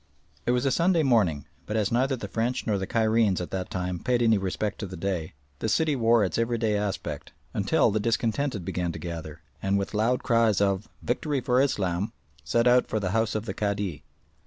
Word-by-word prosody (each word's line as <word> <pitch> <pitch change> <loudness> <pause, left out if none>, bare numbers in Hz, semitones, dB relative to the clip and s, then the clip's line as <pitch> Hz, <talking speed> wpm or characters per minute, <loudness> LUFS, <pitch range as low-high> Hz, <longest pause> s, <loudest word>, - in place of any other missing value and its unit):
It - - +4
was 125 +2 +1
a 135 - +3
Sunday 170 +2 +3
morning, 100 - +2 0.2
but 105 - -1
as 105 -2 +1
neither 130 +3 +2
the 125 - -6
French 115 +3 -1
nor 105 -3 0
the 95 - -3
Cairenes 110 -3 +2
at 90 - -5
that 95 -1 -3
time 90 -1 -3
paid 125 +2 +1
any 110 -3 +4
respect 95 +2 -2
to 105 - -4
the 95 0 -8
day, 90 -3 -3 0.3
the 110 - -1
city 155 +5 +2
wore 115 -2 +4
its 95 - -2
everyday 115 -2 +1
aspect, 100 -1 -3 0.2
until - - +2
the 110 - +1
discontented 115 -1 -1
began 90 -1 -2
to - - -6
gather, 80 -2 -7 0.2
and 100 0 +1
with 100 +2 -3
loud 115 +4 +1
cries 115 -4 +3
of 100 +1 0
"Victory 140 +4 -1
for 125 0 +2
Islam!" 100 -5 0 0.3
set 115 +11 +1
out 125 0 +5
for 110 - -1
the 95 -3 -2
house 110 +1 +1
of 110 0 -2
the - - -3
Cadi. 100 -6 -2
110 Hz, 205 wpm, -27 LUFS, 95-120 Hz, 0.3 s, out